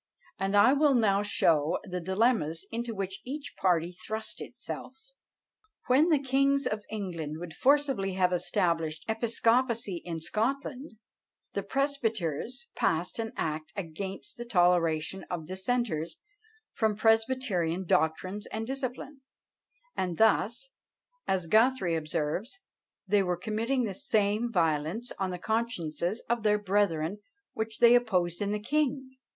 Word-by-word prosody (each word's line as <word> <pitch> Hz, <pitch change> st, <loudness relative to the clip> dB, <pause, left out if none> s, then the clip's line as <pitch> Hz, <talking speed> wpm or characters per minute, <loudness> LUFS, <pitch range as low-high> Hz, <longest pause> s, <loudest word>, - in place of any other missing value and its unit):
and 195 Hz, +1 st, 0 dB
I 255 Hz, +6 st, +7 dB
will 285 Hz, -1 st, +4 dB
now 205 Hz, -4 st, +3 dB
show 165 Hz, -6 st, +2 dB
the 180 Hz, -2 st, -4 dB
dilemmas 190 Hz, -4 st, +1 dB
into 230 Hz, 0 st, -3 dB
which 195 Hz, 0 st, -4 dB
each 280 Hz, +3 st, -6 dB
party 175 Hz, -2 st, +1 dB
thrust 200 Hz, +5 st, -5 dB
itself. 260 Hz, -, -7 dB, 0.9 s
When 280 Hz, +7 st, +4 dB
the 310 Hz, -, +5 dB
kings 275 Hz, +1 st, +2 dB
of 215 Hz, 0 st, -1 dB
England 175 Hz, -8 st, -4 dB
would 170 Hz, -1 st, -7 dB
forcibly 270 Hz, -, +2 dB
have 185 Hz, -1 st, +2 dB
established 165 Hz, -4 st, 0 dB
episcopacy 230 Hz, -3 st, +1 dB
in 165 Hz, -2 st, -4 dB
Scotland, 255 Hz, -, -2 dB, 0.6 s
the -, -, -1 dB
presbyters 255 Hz, -, -2 dB
passed 170 Hz, +7 st, 0 dB
an 225 Hz, -1 st, -2 dB
act 155 Hz, +1 st, -3 dB
against 190 Hz, -4 st, -6 dB
the 240 Hz, -, -5 dB
toleration 175 Hz, -3 st, +2 dB
of 170 Hz, -3 st, -4 dB
dissenters 190 Hz, -, -2 dB, 0.6 s
from 220 Hz, -2 st, +1 dB
presbyterian 220 Hz, -6 st, +1 dB
doctrines 185 Hz, +3 st, 0 dB
and 220 Hz, +1 st, -4 dB
discipline; 270 Hz, +2 st, -5 dB, 0.7 s
and 180 Hz, -3 st, -2 dB
thus, 235 Hz, +4 st, +2 dB, 0.6 s
as 185 Hz, -2 st, +1 dB
Guthrie 220 Hz, -1 st, +3 dB
observes, 160 Hz, -, -2 dB, 0.5 s
they 200 Hz, +1 st, +4 dB
were 180 Hz, -2 st, 0 dB
committing 225 Hz, +7 st, -1 dB
the 205 Hz, -4 st, -2 dB
same 210 Hz, +4 st, +1 dB
violence 165 Hz, +5 st, 0 dB
on 190 Hz, -1 st, 0 dB
the 180 Hz, -, -4 dB
consciences 200 Hz, -3 st, -2 dB
of 235 Hz, 0 st, 0 dB
their 210 Hz, -1 st, +3 dB
brethren 200 Hz, -3 st, 0 dB, 0.3 s
which 220 Hz, 0 st, -3 dB
they 235 Hz, 0 st, +7 dB
opposed 185 Hz, -8 st, +2 dB
in 205 Hz, 0 st, 0 dB
the 210 Hz, -, -1 dB
king. 265 Hz, +1 st, -1 dB
205 Hz, 130 wpm, -29 LUFS, 175-240 Hz, 0.9 s, I